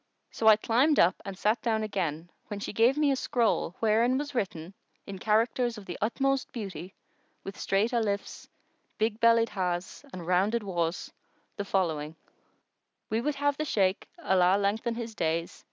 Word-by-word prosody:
So 220 - -1
I 220 - +9
climbed 250 +8 +2
up 175 - +3
and 195 -1 -6
sat 215 +4 +1
down 220 -2 0
again 175 -5 -3 0.2
when 205 - -5
she 205 - -5
gave 235 +6 +3
me 295 -2 +3
a - - +2
scroll, 235 -8 0
wherein 230 +3 +3
was 290 +1 -4
written, 185 -6 -3 0.3
in 195 -2 -7
characters 230 +3 +1
of 205 - -10
the 175 - -6
utmost 270 +5 0
beauty, 195 - -7 0.5
with 195 - -7
straight 200 +5 +1
Alifs,[FN#116] 205 -4 -2 0.5
big 220 0 0
bellied 230 -1 +4
Hás 180 +3 -3
and 180 -5 -8
rounded 195 +6 +1
Waws, 170 -3 -2 0.4
the 200 - -4
following:—We 165 +5 -5
would 295 +3 -1
have 285 0 0
the 310 - -2
Shaykh 195 -8 0
(Allah 190 - +3
lengthen 215 +4 -1
his 230 -1 -5
days!) 165 -3 -2
210 Hz, 160 wpm, -28 LUFS, 185-235 Hz, 0.5 s, I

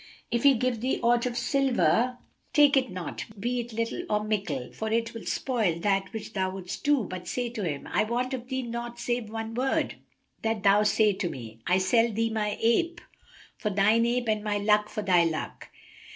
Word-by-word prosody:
If 235 - +1
he 280 0 +6
give 245 -1 -1
thee 255 +2 0
aught 240 +1 +3
of 240 -1 -4
silver, 250 - +2 0.4
take 290 -2 +6
it 260 -2 +2
not, 180 -2 -5
be 245 +4 -1
it 240 0 -5
little 230 +8 -2
or 210 0 +1
mickle, 195 -12 -2
for 220 0 -4
it 230 0 0
will 230 - -8
spoil 220 -11 0
that 195 +1 0
which 220 0 -7
thou 190 -2 0
wouldst 185 -1 -7
do, 290 -4 +3
but 180 -1 -7
say 245 +5 -2
to 225 -4 -4
him, 145 -5 -3
'I - - +1
want 245 +4 -1
of 250 -2 -5
thee 260 0 -2
naught 235 0 -5
save 240 -2 -2
one 225 0 -5
word, 255 +3 0 0.4
that 225 -2 -1
thou 200 +1 +5
say 210 0 +3
to 185 -2 -2
me, 115 -5 -9
'I 180 - +4
sell 225 +5 +3
thee 225 +1 0
my 210 -1 -1
ape 335 +10 +2 0.6
for 210 - -2
thine 210 +4 +3
ape 240 0 0
and 215 -1 0
my 210 -1 0
luck 210 +1 +2
for 215 - -4
thy 180 -3 +4
luck.' 160 -2 -3
225 Hz, 205 wpm, -27 LUFS, 200-240 Hz, 0.6 s, he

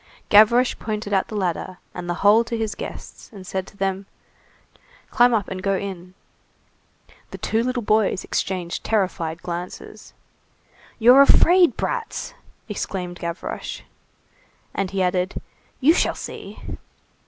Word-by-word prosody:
Gavroche 235 +4 +5
pointed 215 -1 -4
out 190 - +2
the 215 - -7
ladder 185 -1 -2 0.2
and 175 -1 -6
the 175 - 0
hole 215 +3 +7
to 230 0 -3
his 220 -2 -2
guests, - - -9
and 195 -4 -11
said 190 0 -4
to 200 - -16
them:— 195 0 -2 1.0
"Climb 245 0 +5
up 215 -5 +1
and 185 -1 -5
go 195 0 +1
in." 185 -2 -7 1.1
The - - -8
two 225 - 0
little 250 0 -2
boys 210 -3 +2
exchanged 180 -2 -3
terrified 175 -6 -1
glances. 175 +1 -7 0.8
"You're 245 +4 +7
afraid, 350 +5 +6
brats!" 485 -2 -3 0.3
exclaimed 180 -4 -4
Gavroche. 170 +1 -5 0.9
And 195 -1 -2
he 195 0 0
added:— 180 +1 0 0.4
"You 290 +5 +5
shall - - +1
see!" - - -8
195 Hz, 130 wpm, -22 LUFS, 185-225 Hz, 1.1 s, hole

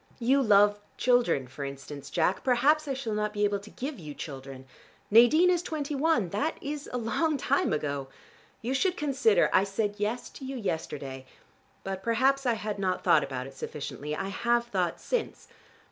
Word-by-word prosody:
You 260 +4 +3
love 205 -3 +5 0.2
children, 245 - +2
for 135 +3 -7
instance, 140 +1 -7
Jack. 175 +2 +1
Perhaps 285 +5 +3
I 270 - -1
shall 240 -5 -3
not 210 0 -1
be 210 0 -1
able 205 -1 +1
to 205 +2 -13
give 270 +1 -6
you 150 -3 -8
children. 135 -2 -8 0.5
Nadine 275 - +6
is 350 -2 +2
twenty 305 -4 -4
one. 280 - +2
That 215 - -1
is 290 0 -5
a 250 - -2
long 250 +7 0
time - - +1
ago. 140 -3 -2 0.6
You 245 +3 -1
should 360 +6 +1
consider. 300 - +3
I 185 - +5
said 205 +1 -2
'yes' 220 +4 -2
to - - -11
you 265 +1 -5
yesterday, 140 - -4 0.6
but 190 0 -4
perhaps 260 +5 +2
I 240 - +4
had 210 -2 -4
not 185 -2 -1
thought 150 - +5
about 130 -2 -4
it 135 - -10
sufficiently. 150 +2 -5
I 195 - -3
have 235 +4 +1
thought 185 -7 -1
since. - - -3
215 Hz, 180 wpm, -28 LUFS, 165-270 Hz, 0.6 s, Nadine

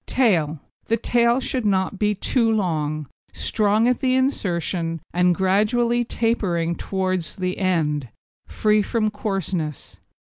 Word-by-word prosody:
TAIL 165 - +2 0.3
The 230 - +1
tail 235 +2 +2
should 255 -1 -2
not 195 -1 0
be 210 0 +1
too 230 +3 +1
long, 155 -8 -1 0.3
strong 215 +1 +2
at 250 - +2
the 255 -1 +1
insertion, 175 - -1
and 180 0 +3
gradually 215 +6 +2
tapering 195 -8 0
towards 185 -2 -2
the 185 -1 -3
end, 150 - 0 0.4
free 210 - +2
from 215 +1 0
coarseness. 190 - -4
195 Hz, 125 wpm, -22 LUFS, 170-225 Hz, 0.4 s, and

